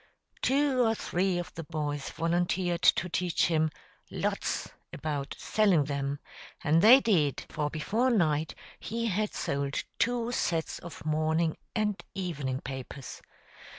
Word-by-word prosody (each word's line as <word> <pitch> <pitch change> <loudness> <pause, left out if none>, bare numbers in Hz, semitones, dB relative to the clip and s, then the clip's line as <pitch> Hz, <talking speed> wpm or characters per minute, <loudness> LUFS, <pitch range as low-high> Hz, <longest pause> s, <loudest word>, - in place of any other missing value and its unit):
Two 275 -1 +3
or 225 -1 +2
three 185 -2 0
of 175 0 -5
the 165 - -6
boys 150 -3 -3
volunteered 175 +2 0
to 180 - +4
teach 175 0 +1
him 160 -1 +2 0.4
"lots" - - -2 0.2
about 145 -2 -3
selling 200 -8 +3
them; 140 0 -2 0.5
and 160 +2 +4
they 240 +7 +9
did, 160 - +1
for 150 -1 -1
before 210 - 0
night 160 -9 +1 0.2
he 230 +1 -3
had 210 +2 -1
sold 140 0 -1 0.2
two 240 0 +1
sets 165 -8 -1
of 170 -2 -10
morning 155 +1 +1 0.2
and 210 -2 0
evening 145 -9 -3
papers. 130 0 -7
170 Hz, 130 wpm, -29 LUFS, 150-205 Hz, 0.5 s, they